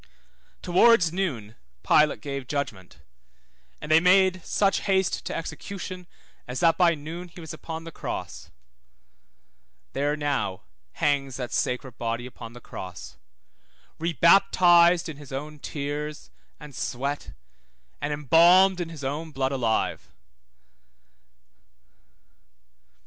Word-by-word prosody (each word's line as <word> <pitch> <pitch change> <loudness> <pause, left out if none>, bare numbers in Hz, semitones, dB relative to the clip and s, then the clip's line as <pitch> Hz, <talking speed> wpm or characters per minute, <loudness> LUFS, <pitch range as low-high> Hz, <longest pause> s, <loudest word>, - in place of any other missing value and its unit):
Towards 180 -1 +4
noon 130 - -3 0.3
Pilate 150 0 +3
gave 140 -3 -5
judgment, 100 - -5 0.8
and 150 - -6
they 160 - +7
made 185 0 +4
such 200 -1 +1
haste 190 -2 +1
to - - -4
execution 180 +2 -6 0.4
as 125 +1 -4
that 165 -1 +4
by 170 -1 +4
noon 165 +4 -7
he 175 - -14
was 160 -2 -8
upon 160 +1 -7
the 165 - -9
cross. - - -6 1.4
There 145 +2 0
now 145 -10 -2 0.3
hangs 135 -3 0
that 125 -2 -5
sacred 125 -1 -2
body 115 +1 -2
upon 115 -2 -10
the 120 - -11
cross, 90 -6 -9 0.8
rebaptized 170 +1 +5
in 155 -3 -7
his 145 -2 -13
own 150 +3 -6
tears, 150 +1 -5 0.3
and 150 -1 -11
sweat, 140 +3 -4 0.7
and 145 - -2
embalmed 175 +6 +5
in 170 - -4
his 155 -4 -9
own 150 +4 -3
blood 135 -2 -2
alive. 120 -5 -1
150 Hz, 115 wpm, -25 LUFS, 135-175 Hz, 1.4 s, they